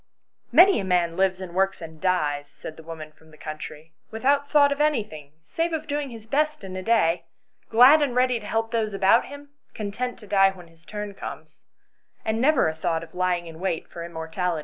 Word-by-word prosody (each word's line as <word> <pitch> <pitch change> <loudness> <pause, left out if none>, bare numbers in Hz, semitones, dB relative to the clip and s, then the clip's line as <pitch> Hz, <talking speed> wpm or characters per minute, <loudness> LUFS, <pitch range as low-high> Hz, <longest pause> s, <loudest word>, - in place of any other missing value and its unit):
" - - -56
Many 360 +9 +7
a - - -2
man 175 -3 +1
lives 190 0 +1
and 185 -2 -8
works 195 +1 +1
and 160 -2 -10
dies," 145 -6 0
said 155 - -10
the - - -12
woman 160 -1 -9
from 160 +1 -23
the 155 - -17
country, 155 +1 -8
" - - -47
without 280 +5 +1
thought 285 -2 +5
of 280 +1 -1
any 300 -7 +2
thing 150 -7 -12
save 330 - -2
of 315 -1 -2
doing 290 -1 -3
his 225 -3 -10
best 300 +2 0
in 190 -1 -7
his 185 0 -5
day, 170 -7 +2 0.4
glad 255 +7 +7
and 270 -4 0
ready 250 -1 +2
to 210 - -10
help 225 +1 -1
those 220 -3 -1
about 195 +4 +4
him, 285 0 -11 0.3
content 220 +4 -4
to 220 - -14
die 195 -1 +4
when 180 -3 -12
his 165 0 -24
turn 210 0 -6
comes, - - -9 0.6
and 220 +1 0
never 280 - +4
a 160 - -1
thought 165 0 -2
of 165 - -13
lying 180 -1 0
in 165 -1 -10
wait 180 -3 -2
for 170 - -7
immortality." 170 +1 -3
195 Hz, 220 wpm, -25 LUFS, 165-245 Hz, 0.6 s, Many